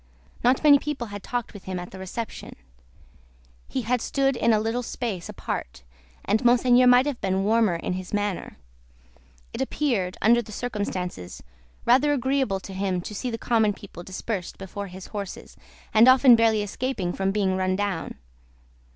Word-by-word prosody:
Not 250 +4 +3
many 290 -2 +7
people 285 -5 -4
had 205 - -6
talked 240 +3 -4
with 205 - -12
him 185 -1 -4
at 175 - -8
the 190 - -10
reception; 200 +5 -6 1.1
he 260 - -3
had 245 +1 0
stood 270 +1 +1
in 235 - +2
a 215 - +4
little 225 +3 -1
space 230 -7 -4
apart, 65 0 -5 0.4
and 215 +4 +1
Monseigneur 245 +1 +5
might 250 +1 +6
have 290 -4 -3
been 190 0 0
warmer 215 -3 +3
in 165 - -3
his 185 0 -6
manner. 205 -2 -2 1.0
It 230 - -4
appeared, 235 -10 -1
under 235 +3 +4
the 215 - -12
circumstances, 185 - -4 0.4
rather 270 +5 +4
agreeable 265 -6 0
to 195 - -9
him 190 -1 -1
to 210 - -7
see 245 +5 -3
the 230 - -3
common 220 -3 +2
people 195 -4 -11
dispersed 190 +1 -5
before 195 +1 -6
his 185 0 -10
horses, 200 -2 -6 0.4
and 220 +3 +7
often 255 -1 +8
barely 225 -2 +3
escaping 205 -4 -3
from 195 0 -1
being 195 -2 +1
run 185 0 0
down. 200 -4 -3
215 Hz, 170 wpm, -25 LUFS, 190-245 Hz, 1.1 s, often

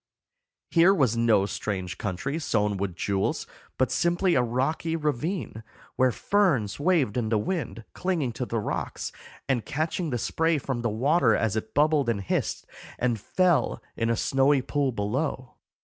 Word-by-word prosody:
Here 175 +3 +6
was 130 - +2
no 115 -4 +3
strange 95 -2 -4
country 125 - -3
sown 105 -8 0
with 95 -2 -3
jewels, 95 +2 -1 0.3
but 130 0 +1
simply 170 +7 +2
a 125 - +4
rocky 135 +7 -1
ravine, 150 - -2 0.3
where 130 0 +3
ferns 140 - +1
waved 145 - +2
in 115 -3 0
the 110 - +2
wind, 130 - -3
clinging 170 -9 -1
to 125 +2 -4
the 115 - -2
rocks, 105 - -3 0.4
and 130 -5 +1
catching 160 +3 -2
the 125 - -1
spray 160 +7 +1
from 130 -3 -3
the 115 - 0
water 125 +2 +3
as 110 -2 0
it 110 0 -4
bubbled 150 -3 +3
and 105 -4 0
hissed 95 - -2 0.3
and 120 -3 0
fell 180 - +2 0.2
in 115 0 0
a 115 - +1
snowy 135 +2 +3
pool 140 -1 0
below. 125 +5 -2
130 Hz, 160 wpm, -26 LUFS, 110-155 Hz, 0.4 s, Here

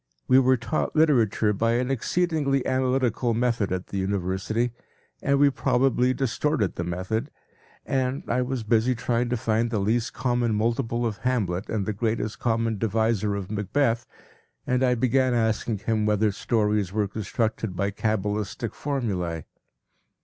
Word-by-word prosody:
We 130 +1 +6
were 130 0 +4
taught 120 +6 -2
literature 115 -9 +3
by 115 +3 +1
an 125 +2 0
exceedingly 145 -1 0
analytical 130 -2 +1
method 115 -5 0
at 95 0 -3
the 100 - -3
University, 95 +5 -1 0.5
and 140 0 +2
we 140 0 +5
probably 125 -1 +2
distorted 135 -3 0
the 85 - -3
method, 95 - -2 0.6
and 130 0 -1
I 125 - +1
was 125 -2 -2
busy 115 +3 +2
trying 120 +1 0
to 125 - 0
find 115 +1 0
the 115 - -1
least 110 +5 0
common 120 -3 0
multiple 115 +2 0
of 110 -3 -2
Hamlet 100 -8 -1
and 105 -3 -1
the 105 - -1
greatest 110 0 -2
common 115 -2 0
divisor 110 -1 +1
of 100 -1 -5
Macbeth, 115 +4 0 0.6
and 125 +1 +1
I 125 -1 +3
began 130 +1 +2
asking 110 -1 0
him 110 0 0
whether 105 0 +2
stories 105 -2 0
were 105 0 0
constructed 110 0 -2
by 100 +2 0
cabalistic 105 +2 -2
formulae. 95 - -2
115 Hz, 150 wpm, -25 LUFS, 105-125 Hz, 0.6 s, We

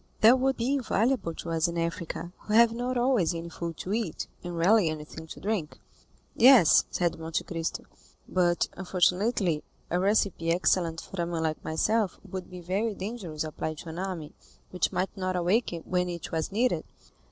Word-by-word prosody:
"That 240 +4 +7
would 265 0 +1
be 245 +4 0
invaluable 240 -8 0
to 170 - -6
us 165 +1 +2
in 170 0 -4
Africa, 170 +1 -3
who 215 - -2
have 230 0 +7
not 245 +2 -2
always 240 -9 +2
any 165 0 -5
food 165 -1 -5
to 190 - -4
eat, 215 -7 -2 0.2
and 175 -1 -5
rarely 185 +1 +4
anything 155 +1 -7
to - - -9
drink." 200 -7 -3 0.6
"Yes," 245 - +7
said 170 -2 -1
Monte 160 0 -2
Cristo; 165 -2 -4 0.4
"but, 175 -2 +2
unfortunately, 180 -1 +1 0.3
a 175 - +2
recipe 195 -4 +1
excellent 170 -1 +1
for 195 - -5
a 170 - -1
man 170 -2 -2
like 155 -1 -2
myself 205 +5 0
would 185 -1 -6
be 180 -1 -9
very 200 +5 -1
dangerous 185 -7 -4
applied 155 0 -4
to 165 - -8
an 160 +2 -6
army, 180 -6 -4 0.4
which 180 -2 0
might 190 - -2
not 185 -1 -2
awake 180 +7 +1
when 180 -1 0
it 170 -2 -6
was 160 +2 -2
needed." 240 +5 +1
180 Hz, 175 wpm, -28 LUFS, 165-215 Hz, 0.6 s, That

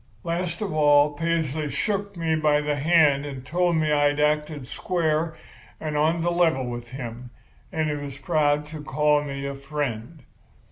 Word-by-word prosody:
Last 170 +1 -2
of 200 -5 -2
all 145 -1 +4
Paisley 155 -2 -1
shook 200 +2 -2
me 165 -1 0
by 150 -1 +3
the 150 0 -1
hand 145 -2 +4
and 135 -3 -7
told 175 +4 +1
me 155 -1 +1
I'd 145 0 +2
acted 150 -1 0
square 160 +2 -1 0.4
and 155 -1 -4
on 160 +3 +2
the 175 - +1
level 165 -7 +2
with 120 -1 -5
him 120 -1 -7 0.4
and 160 -1 0
he 150 - -1
was 140 -2 -6
proud 150 -2 +1
to 155 -1 -7
call 150 0 +2
me 140 -1 -5
a 140 - -3
friend. 140 0 -5
150 Hz, 170 wpm, -25 LUFS, 145-165 Hz, 0.4 s, all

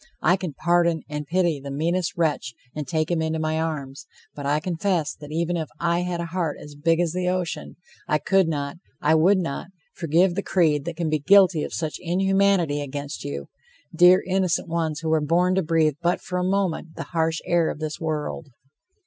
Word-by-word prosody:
I 175 +3 +5
can 180 -5 -5
pardon 170 -1 +2
and 150 -1 -5
pity 170 -3 +1
the 140 +1 -8
meanest 170 +6 -1
wretch 150 -7 0 0.2
and 150 -3 -5
take 155 +3 -1
him 170 -2 +1
into 160 0 -1
my 155 0 -1
arms, 140 -3 -4 0.3
but 145 -1 -5
I 145 +1 +2
confess 170 -1 -1
that 150 0 -11
even 170 +2 -1
if 160 -3 -3
I 170 0 +1
had 180 -1 -2
a 170 - -2
heart 170 -3 -2
as 150 - -11
big 165 +3 +1
as 170 -2 +1
the 180 0 0
ocean, 180 -2 -3 0.3
I 150 -3 +2
could 190 +4 +2
not, 145 -1 -3 0.2
I 150 - +3
would 175 +6 +5
not, 165 -5 -3 0.3
forgive 175 +2 +2
the 200 - -1
creed 155 -8 +2
that 170 -1 -4
can 165 -3 -1
be 155 - +1
guilty 180 -1 +5
of - - -5
such 155 -2 -3
inhumanity 190 -3 +2
against 145 +1 -5
you, 70 0 -5 0.5
dear, 180 +2 +6
innocent 185 -2 0
ones, 160 -2 -2
who 160 - -2
were 160 -1 +3
born 175 +5 +2
to 190 - +2
breathe 160 -3 +2
but 175 +1 +1
for 180 0 -3
a - - 0
moment 185 -4 -1
the - - -4
harsh 160 -1 +1
air 170 -2 +2
of - - -4
this 155 0 -4
world! 155 -1 -3
165 Hz, 205 wpm, -24 LUFS, 150-180 Hz, 0.5 s, dear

